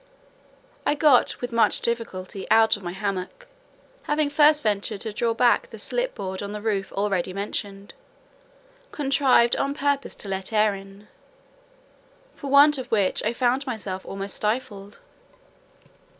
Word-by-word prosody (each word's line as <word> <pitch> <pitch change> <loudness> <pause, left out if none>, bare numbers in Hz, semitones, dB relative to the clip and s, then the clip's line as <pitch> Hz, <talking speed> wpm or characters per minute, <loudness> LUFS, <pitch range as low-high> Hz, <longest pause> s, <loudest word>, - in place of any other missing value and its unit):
I - - +1
got 290 -4 +3
with 245 0 -4
much 230 -1 +2
difficulty 200 -5 -4
out 225 0 +5
of 205 - -10
my 175 -2 -5
hammock, 195 - -4 0.6
having 295 -1 0
first 300 0 +4
ventured 205 -1 -1
to 220 - -4
draw 230 +1 0
back 250 - +3
the - - -10
slip - - -3
board 190 -1 -5
on 200 0 -5
the 210 - -6
roof 200 -3 -1
already 195 -3 -1
mentioned, 200 0 -5 1.0
contrived 270 -4 +3
on 280 +1 -1
purpose 285 -1 -1
to - - -7
let 190 +2 -4
in 220 - 0
air, 200 -1 -1 1.3
for 280 - -8
want 285 +1 +6
of 255 - -7
which 200 -4 +1
I 220 - 0
found 255 +3 0
myself 200 -6 -5
almost 195 0 -5
stifled. 210 -2 -3
220 Hz, 145 wpm, -24 LUFS, 195-275 Hz, 1.3 s, want